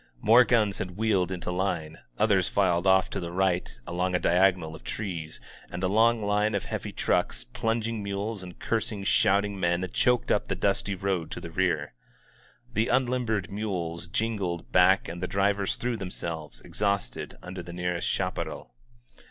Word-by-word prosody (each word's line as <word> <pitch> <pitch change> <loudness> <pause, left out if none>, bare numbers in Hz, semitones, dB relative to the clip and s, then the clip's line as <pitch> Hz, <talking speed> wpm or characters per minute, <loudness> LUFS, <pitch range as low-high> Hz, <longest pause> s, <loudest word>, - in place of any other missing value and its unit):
More 115 - +7
guns 110 -5 +2
had 90 0 -5
wheeled 100 -5 +1
into, 90 -1 -3
line; 85 -4 -2 0.2
others 100 -4 +3
filed 95 -2 +2
off 95 0 +5
to 100 - -2
the 85 -2 -5
right 90 -4 0
along 90 +1 -1
a - - +2
diagonal 90 -3 +3
of 80 - -11
trees, 85 -7 -5 0.3
and 90 +1 -6
a - - +3
long 110 +3 +3
line 105 +1 +2
of - - -2
heavy - - -4
trucks, - - 0
plunging 115 -1 -2
mules^ 100 +1 -3
and 90 -1 -10
cursing, 110 -3 -2
shouting 100 +1 +2
men 85 +1 +1
choked 125 -1 +2
up - - +1
the - - -1
dusty 100 0 0
road 95 -3 -1
to - - -5
the 85 - -8
rear. 80 -6 0 0.8
The 110 +2 +1
unlimbered 120 -7 0
mules 85 -5 -3
jingled 95 -4 -2
back 95 +4 +5
and 85 +1 -6
the 90 - -1
drivers 100 0 +1
threw 120 -1 -2
themselves, 80 - -5
exhausted, 100 -12 -2
under 90 0 -6
the 85 - -9
nearest 90 -1 -2
chaparral. - - -3
95 Hz, 165 wpm, -27 LUFS, 90-105 Hz, 0.8 s, More